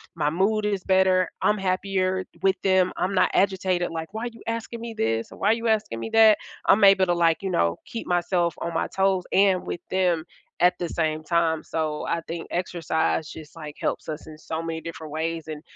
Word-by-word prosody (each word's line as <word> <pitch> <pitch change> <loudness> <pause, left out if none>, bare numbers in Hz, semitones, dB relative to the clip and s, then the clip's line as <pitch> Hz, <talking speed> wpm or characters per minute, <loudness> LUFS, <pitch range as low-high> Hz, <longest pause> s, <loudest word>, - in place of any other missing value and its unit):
my 150 -3 +1
mood 210 +5 +1
is 200 -3 -1
better, 185 -1 +3
I'm 210 - +3
happier 185 0 0 0.2
with 195 0 +3
them, 185 -1 +3
I'm 185 +2 -1
not - - +3
agitated, 185 -2 +1
like, 160 +3 -6
"Why 225 +2 -3
you 230 - -15
asking 230 0 -4
me 230 -1 -6
this? 115 - -1
And - - -12
why 205 - +2
are - - +6
you 230 0 -3
asking 215 - 0
me - - -4
that?" 220 -1 +7 0.3
I'm 205 +1 +5
able 195 -1 +7
to, 175 - +1
like, 170 +1 +2
you 190 - -1
know, 85 - +3 0.2
keep 230 - -7
myself 175 -1 +1
on 170 - -4
my 165 - 0
toes 190 -1 +1
and 190 -2 +3
with 175 - -4
them 180 -4 +1 0.4
at 180 0 +6
the 175 - -2
same 155 -2 -1
time 165 0 +1
so, 155 -2 -3
I 170 - -1
think 165 0 -5
exercise 165 -2 -1
just, 155 -2 -11
like, 150 -2 -8
helps - - -2
us 155 0 -5
in 155 -1 -11
so 160 +1 -5
many 165 -1 -4
different 160 -2 -8
ways, 165 +1 -3
and 150 -1 -6
180 Hz, 215 wpm, -25 LUFS, 160-195 Hz, 0.4 s, that